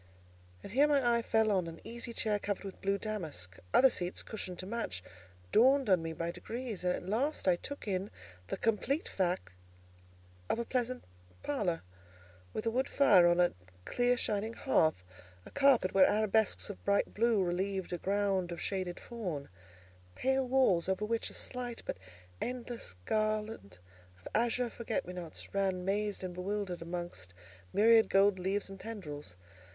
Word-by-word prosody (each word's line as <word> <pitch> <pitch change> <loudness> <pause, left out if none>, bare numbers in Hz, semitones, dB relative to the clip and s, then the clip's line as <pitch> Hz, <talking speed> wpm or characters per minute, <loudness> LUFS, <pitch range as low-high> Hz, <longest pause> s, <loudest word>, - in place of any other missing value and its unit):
And - - -8
here 280 +7 +5
my 260 -5 +3
eye - - 0
fell 220 -1 +2
on 185 -4 +1
an 165 0 -8
easy 235 0 -5
chair 215 -2 0
covered 205 -1 -3
with 195 -1 -8
blue 195 0 +1
damask. 160 - -5
Other 265 0 +6
seats, 180 -3 -2
cushioned 185 -5 -6
to 185 - -5
match, 195 - -3 0.5
dawned 260 0 +5
on 180 -3 +5
me 165 0 -3
by 165 +1 -3
degrees; 230 0 -5
and 180 - +2
at - - -7
last 250 +5 0
I 180 - +6
took 285 +7 -7
in 195 0 -1 0.4
the - - -3
complete 240 +7 0
fact 180 - -1 1.0
of - - +1
a 235 - -2
pleasant 250 0 -1 0.4
parlour, 205 - -1 0.7
with 215 - -4
a 225 - +2
wood 260 +4 0
fire 195 -11 +6
on 175 0 +3
a 175 0 +4 0.3
clear 245 0 +2
shining 215 0 -1
hearth, 160 - +2 0.4
a - - -12
carpet 275 -9 +4
where 190 -1 +6
arabesques 215 0 +2
of 200 - -12
bright 200 0 +1
blue 225 -2 +3
relieved 185 +1 -1
a 175 - -2
ground 195 -2 0
of 170 - -5
shaded 185 -3 -2
fawn; 180 - -5 0.7
pale 265 0 +1
walls 245 -10 +3
over 190 +2 0
which 230 +1 -1
a - - -8
slight 245 -2 -3
but - - -4 0.4
endless 240 - -5
garland 215 - -1 0.4
of 90 - -11
azure 240 +1 +1
forget 225 -1 -3
me 180 - -7
nots 175 -3 -7
ran 190 -2 0
mazed 205 0 -1
and 185 -1 -4
bewildered 185 0 -3
amongst 170 - -5 0.4
myriad 225 +1 +6
gold 195 0 +4
leaves 195 +3 -1
and 195 0 -10
tendrils. 150 - -7
205 Hz, 165 wpm, -33 LUFS, 180-230 Hz, 1.0 s, Other